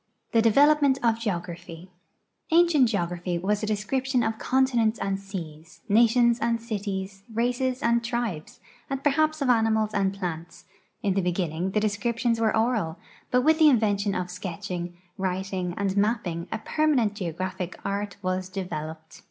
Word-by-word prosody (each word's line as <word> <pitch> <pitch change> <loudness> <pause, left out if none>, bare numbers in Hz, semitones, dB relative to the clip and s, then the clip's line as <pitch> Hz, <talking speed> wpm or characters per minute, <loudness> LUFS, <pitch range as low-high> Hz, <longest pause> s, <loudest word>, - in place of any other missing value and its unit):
THE 225 - +4
DEVELOPMENT 280 +4 +5
OF 230 -1 +2
GEOGRAPHY 175 -4 -5 0.6
Ancient 325 -7 +5
geogra[)hy 175 -3 -2
was 205 +3 0
a 215 - -2
description 250 +5 0
of 220 0 -2
continents 245 -4 +2
and 195 0 -2
seas, 170 -5 -9
nations 235 +2 +4
and 230 0 0
cities, 200 -4 -4
races 250 +3 0
and 235 0 +3
tril)es, 235 -9 -3 0.3
and 270 0 -3
perhaps 310 +1 +2
of 260 - 0
animals 220 -2 +2
and 195 -1 0
])lants; 170 -3 -5 0.4
in 200 - +2
the 195 - +1
beginning 175 -1 -1
the 210 - +1
descriptions 230 +2 0
were 220 -1 +2
oral, 220 -8 0 0.3
but 250 - +3
with 315 +2 +4
the 310 -1 +8
invention 205 -5 +2
of 180 0 -3
sketching, 180 -1 -5 0.2
writing, 185 -1 -2
and 195 -1 -1
mapping 200 -5 0
a - - -1
permanent 250 -2 +1
geo 185 -5 -4
graphic 185 +1 -5
art 200 0 -3
was 185 0 -2
developed. 160 -4 -6
205 Hz, 150 wpm, -26 LUFS, 185-235 Hz, 0.6 s, the